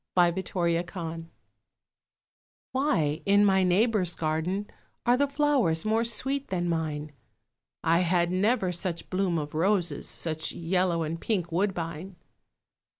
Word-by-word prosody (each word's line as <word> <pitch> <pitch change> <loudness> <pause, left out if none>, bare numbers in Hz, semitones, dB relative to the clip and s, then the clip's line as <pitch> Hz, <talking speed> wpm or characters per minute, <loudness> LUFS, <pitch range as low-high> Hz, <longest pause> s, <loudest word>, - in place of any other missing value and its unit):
MY 175 -1 +5
NEIGHBOUR'S 170 -2 -1
GARDEN 165 -2 -6 1.4
Why 185 - +1
in 205 +1 +4
my 190 -1 +4
neighbour's 185 0 +2
garden 165 +6 -1 0.4
Are 245 - +5
the 285 +2 +2
flowers 280 - +1
more 220 +1 +2
sweet 270 +4 -1
than 175 -2 -1
mine? 155 -3 -2 0.7
I 165 +1 +3
had 175 -1 +2
never 195 +1 +1
such 175 -1 -4
bloom 185 -2 +1
of 150 -1 -4
roses, 175 -2 0
Such 160 -1 -2
yellow 170 0 0
and 165 +2 -4
pink 185 -7 -1
woodbine. 175 -1 -2
180 Hz, 125 wpm, -27 LUFS, 165-205 Hz, 1.4 s, MY